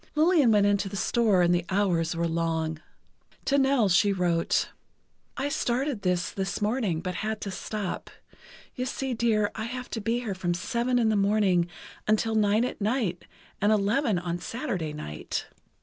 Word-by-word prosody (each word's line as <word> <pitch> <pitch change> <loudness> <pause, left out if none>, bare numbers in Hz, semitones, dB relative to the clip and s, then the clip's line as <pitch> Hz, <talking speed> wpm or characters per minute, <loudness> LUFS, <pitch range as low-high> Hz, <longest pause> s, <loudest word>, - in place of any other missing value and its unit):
Lillian 310 -5 +4
went 205 -2 +4
into 200 -1 +1
the 200 - -7
store 210 -5 +3
and 175 0 +4
the 175 0 +1
hours 180 -4 +1
were 170 0 0
long. 160 -1 -1 0.7
To 280 0 +3
Nell 270 -5 +3
she 195 +2 +4
wrote: 175 -3 +1 0.7
I 270 - -1
started 260 -3 -1
this, 180 -2 0
this 195 -1 -3
morning, 210 -6 0
but 180 +1 -3
had 215 0 -2
to 200 - -4
stop. 205 0 -4 0.6
You 255 0 -3
see 265 0 -3
dear 220 -3 +1
I 220 - -4
have 250 +1 -6
to 225 - -3
be 230 +4 0
here 220 -5 -3
from 175 -2 -1
seven 240 +6 0
in 230 -2 +3
the 215 - +2
morning 200 -4 +3 0.4
until 215 +1 +2
nine 215 +2 +3
at 250 - -5
night, 210 -5 -1 0.4
and 205 +2 +4
eleven 215 +2 +2
on 175 0 -3
Saturday 190 - -3
night.... 115 - -5
205 Hz, 170 wpm, -27 LUFS, 180-235 Hz, 0.7 s, Lillian